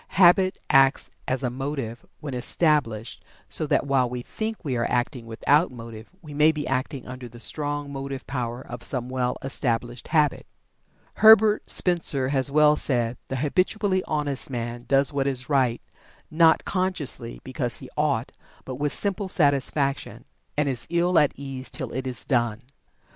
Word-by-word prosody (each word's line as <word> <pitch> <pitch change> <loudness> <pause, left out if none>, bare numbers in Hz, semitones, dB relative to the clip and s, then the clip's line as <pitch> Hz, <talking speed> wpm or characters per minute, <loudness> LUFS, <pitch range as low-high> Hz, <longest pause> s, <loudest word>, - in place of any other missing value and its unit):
Habit 185 +1 +5
acts 135 0 +4 0.2
as 130 +1 -1
a 125 - 0
motive 135 -3 -4 0.2
when 145 -3 -5
established, 125 -4 0 0.2
so - - -1
that - - +1
while 135 -3 +2
we 125 0 -5
think 220 - -5
we 135 -3 -1
are 120 -1 0
acting 120 -1 -1
without 145 +8 +2
motive 115 -2 -10
we 150 -2 -9
may 150 +2 +5
be 150 -2 -4
acting 130 +1 -2
under 125 -1 -8
the 120 +1 -13
strong 145 +2 -3
motive 135 -1 -5
power 125 -1 -4
of 120 0 -8
some 125 -2 -3
well 125 -1 -1
established 120 -3 -2
habit. 150 -3 +1 0.7
Herbert 220 -1 +6
Spencer 155 -7 +3
has 135 0 +1
well 150 +1 +5
said: 120 -5 0
"The 130 - -4
habitually 185 - +1
honest 145 -3 -2
man 120 -1 -5
does 140 0 +2
what 140 -1 0
is 130 -1 -2
right, 130 -5 +1 0.5
not 160 0 +4
consciously 180 - -2
because - - -3
he - - -10
'ought' - - 0 0.3
but 130 -1 -6
with 145 +1 -1
simple 200 - -2
satisfaction; 140 -3 0 0.3
and 150 -1 +2
is 130 -4 -3
ill 175 +1 +3
at 150 - +3
ease 135 -2 -6
till 130 -6 -5
it 130 +1 -3
is 125 -2 -6
done." 120 -3 0
135 Hz, 160 wpm, -25 LUFS, 125-150 Hz, 0.7 s, Herbert